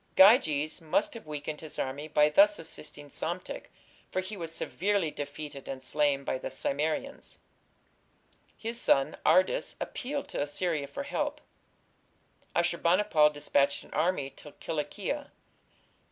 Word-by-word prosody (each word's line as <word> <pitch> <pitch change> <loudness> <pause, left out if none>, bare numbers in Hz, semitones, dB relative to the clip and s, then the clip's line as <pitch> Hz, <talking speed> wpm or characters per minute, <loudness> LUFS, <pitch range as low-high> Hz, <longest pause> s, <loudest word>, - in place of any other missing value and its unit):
Gyges 160 - +6
must 160 +6 +1
have 230 -9 -10
weakened 150 0 -5
his 155 -2 -6
army 140 +3 -3
by 150 -1 +4
thus 205 +7 +6
assisting 150 -2 -7
Psamtik, 175 +3 -4 0.4
for - - -1
he 190 +3 -4
was 165 -4 -4
severely 185 0 0
defeated 145 -1 -7
and 130 -1 -5
slain 145 0 +2
by 130 - -2
the - - -4
Cimmerians. 155 - -2 1.2
His 230 +2 -2
son, 135 - +3
Ardys, 390 - +3
appealed 280 +2 -4
to - - -2
Assyria 145 0 -1
for 280 - -5
help. 295 +1 -2 1.2
Ashur 170 0 +2
bani 180 +5 +4
pal 155 -7 +5
dispatched 140 -1 +1
an - - -14
army 155 -4 +1
to 150 - -13
Cilicia. 180 - -3
160 Hz, 135 wpm, -30 LUFS, 145-200 Hz, 1.2 s, Gyges